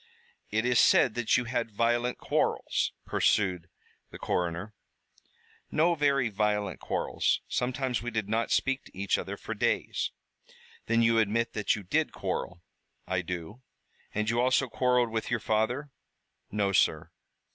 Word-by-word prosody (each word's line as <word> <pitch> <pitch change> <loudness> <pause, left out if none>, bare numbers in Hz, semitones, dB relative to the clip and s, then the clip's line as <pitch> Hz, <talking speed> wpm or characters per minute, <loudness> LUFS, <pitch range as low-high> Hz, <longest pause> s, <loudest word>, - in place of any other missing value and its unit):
"It 110 +2 0
is 125 -1 +3
said 125 - +5
that 120 -1 +2
you 125 - 0
had 115 0 -2
violent 120 +3 0
quarrels," - - 0
pursued 90 -4 +1 0.4
the - - -10
coroner. 90 +4 -2 1.0
"No 170 +3 +3
very 140 -5 +2
violent 105 -3 -1
quarrels. - - 0
Sometimes 125 0 -1
we 120 - -3
did 110 -3 -2
not 115 +2 0
speak 135 0 +1
to - - -16
each 100 0 +1
other - - -5
for - - -5
days." - - 0 0.8
"Then 115 0 +3
you 115 0 +4
admit 115 +2 +1
that 105 -1 +1
you 105 - -7
did 90 - 0
quarrel?" 90 -1 -4 0.4
"I 95 0 -1
do." 90 +6 -6 0.5
"And 105 +1 -1
you 120 +2 +2
also 130 +1 +3
quarreled 125 -1 +2
with 110 0 -2
your 120 -1 0
father?" 120 +7 -1 0.6
"No, 100 -1 0
sir." 80 -3 +2
115 Hz, 145 wpm, -29 LUFS, 100-125 Hz, 1.0 s, said